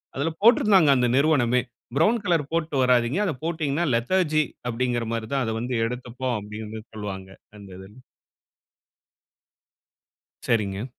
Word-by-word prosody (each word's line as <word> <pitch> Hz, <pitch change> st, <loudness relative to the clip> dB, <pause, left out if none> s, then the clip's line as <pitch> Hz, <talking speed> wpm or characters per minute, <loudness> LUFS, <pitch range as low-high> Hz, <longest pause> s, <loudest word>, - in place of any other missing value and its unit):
அதுல 150 Hz, +4 st, -1 dB
போட்டிருந்தாங்க 210 Hz, -8 st, +5 dB
அந்த 125 Hz, -1 st, +2 dB
நிறுவனமே 130 Hz, -5 st, +3 dB, 0.3 s
"ப்ரவுன் 210 Hz, +9 st, +3 dB
கலர் 165 Hz, -6 st, +1 dB
போட்டு 165 Hz, -2 st, -1 dB
வராதீங்க. 125 Hz, +5 st, +2 dB
அதை 180 Hz, -, -1 dB
போட்டீங்கனா 160 Hz, -1 st, -1 dB
லெதர்ஜி 155 Hz, +4 st, +1 dB, 0.2 s
அப்படீன்கிற 120 Hz, 0 st, -1 dB
மாரி 110 Hz, -1 st, -3 dB
தான் 135 Hz, -1 st, +1 dB
அத 110 Hz, -, -2 dB
வந்து 125 Hz, +1 st, -3 dB
எடுத்துப்போம்." 125 Hz, +1 st, -4 dB
அப்படின்னு 105 Hz, +1 st, -8 dB
சொல்வாங்க, 100 Hz, -3 st, -6 dB, 0.3 s
அந்த 100 Hz, -1 st, -12 dB
இதுல. 95 Hz, +2 st, -13 dB, 2.5 s
சரிங்க. 105 Hz, -1 st, 0 dB
125 Hz, 120 wpm, -24 LUFS, 110-155 Hz, 2.5 s, போட்டிருந்தாங்க